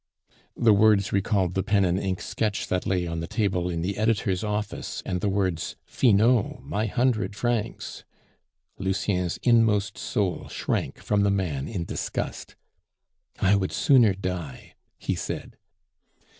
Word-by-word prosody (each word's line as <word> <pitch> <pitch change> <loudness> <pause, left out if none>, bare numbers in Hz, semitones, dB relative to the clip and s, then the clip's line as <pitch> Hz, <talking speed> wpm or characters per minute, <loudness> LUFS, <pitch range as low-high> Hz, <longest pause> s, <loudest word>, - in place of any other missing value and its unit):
The 115 -2 +5
words 105 -1 +4
recalled 100 -2 +1
the 95 - +1
pen 100 0 +2
and 90 +1 +1
ink 95 -2 -2
sketch 105 -2 -2
that 90 - -1
lay 90 -2 +1
on 85 -1 -3
the 85 - -4
table 90 -5 0
in 85 -1 -2
the 100 +3 -2
editor's 105 -4 +1
office 105 0 -3
and 90 -2 -2
the 105 - +1
words, 95 -4 -1
"Finot, 115 -1 +2
my 110 +2 -2
hundred 120 -2 0
francs!" 115 -1 -2 0.8
Lucien's 95 -2 -1
inmost 110 -4 +3
soul 95 -4 -1
shrank - - -2
from 105 -1 0
the 100 - +3
man 85 -9 -1
in 90 -4 -3
disgust. - - -4 0.8
"I 95 +2 +4
would 95 -2 0
sooner 130 - +4
die," 90 -8 -5 0.2
he - - -2
said. - - -5
100 Hz, 145 wpm, -26 LUFS, 90-110 Hz, 0.8 s, The